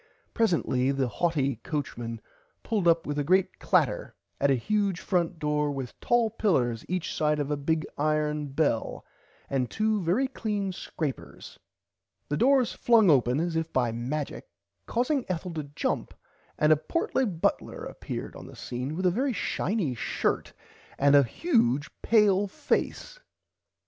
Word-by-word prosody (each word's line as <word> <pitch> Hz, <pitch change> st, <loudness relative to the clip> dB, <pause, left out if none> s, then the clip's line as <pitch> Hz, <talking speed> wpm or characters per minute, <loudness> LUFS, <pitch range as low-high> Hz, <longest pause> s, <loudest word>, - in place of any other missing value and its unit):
Presently 165 Hz, -, +1 dB
the 135 Hz, -2 st, 0 dB
haughty 140 Hz, -3 st, 0 dB
coachman 120 Hz, -4 st, -4 dB, 0.4 s
pulled 210 Hz, -6 st, 0 dB
up 165 Hz, 0 st, +4 dB
with 145 Hz, 0 st, -2 dB
a -, -, +1 dB
great 185 Hz, +5 st, +2 dB
clatter -, -, +1 dB, 0.2 s
at 140 Hz, -, +3 dB
a 135 Hz, -, +4 dB
huge 200 Hz, -, 0 dB
front 175 Hz, -2 st, 0 dB
door 150 Hz, -1 st, 0 dB
with 135 Hz, -3 st, -6 dB
tall 235 Hz, -2 st, +2 dB
pillers 125 Hz, -, +1 dB
each 180 Hz, -2 st, -2 dB
side 150 Hz, 0 st, +1 dB
a 145 Hz, 0 st, -1 dB
big 155 Hz, +2 st, -1 dB
iron 150 Hz, 0 st, 0 dB
bell 140 Hz, -4 st, -1 dB, 0.4 s
and 130 Hz, -3 st, -1 dB
two 215 Hz, -1 st, 0 dB
very 190 Hz, +11 st, +1 dB
clean 210 Hz, -6 st, -2 dB
scrapers. 155 Hz, -5 st, -6 dB, 0.7 s
The 145 Hz, -, 0 dB
doors 260 Hz, -, +3 dB
flung 225 Hz, -7 st, +5 dB
open 130 Hz, -1 st, +3 dB
as 170 Hz, 0 st, -1 dB
if 160 Hz, 0 st, -1 dB
by 125 Hz, -3 st, +1 dB
majic 130 Hz, +6 st, -3 dB, 0.5 s
causing 250 Hz, +5 st, +1 dB
[Pg 250 Hz, -, -10 dB
32] 185 Hz, -, 0 dB
Ethel 170 Hz, +1 st, -7 dB
to 155 Hz, -2 st, -3 dB
jump -, -, -2 dB, 0.4 s
and 155 Hz, +1 st, +5 dB
a -, -, +2 dB
portly 300 Hz, -, 0 dB
butler 170 Hz, -5 st, -1 dB
appeared -, -, -6 dB
on -, -, -10 dB
the -, -, -12 dB
scene 125 Hz, +5 st, -4 dB
with 185 Hz, +2 st, -2 dB
a 180 Hz, -, +5 dB
very 255 Hz, +7 st, 0 dB
shiny 185 Hz, -, -1 dB
shirt 115 Hz, -, -1 dB
front -, -, -18 dB, 0.4 s
and 140 Hz, +1 st, +5 dB
a 140 Hz, -, +8 dB
huge 145 Hz, -, +1 dB
pale 205 Hz, -3 st, +4 dB
face. -, -, -2 dB
160 Hz, 155 wpm, -27 LUFS, 140-205 Hz, 0.7 s, a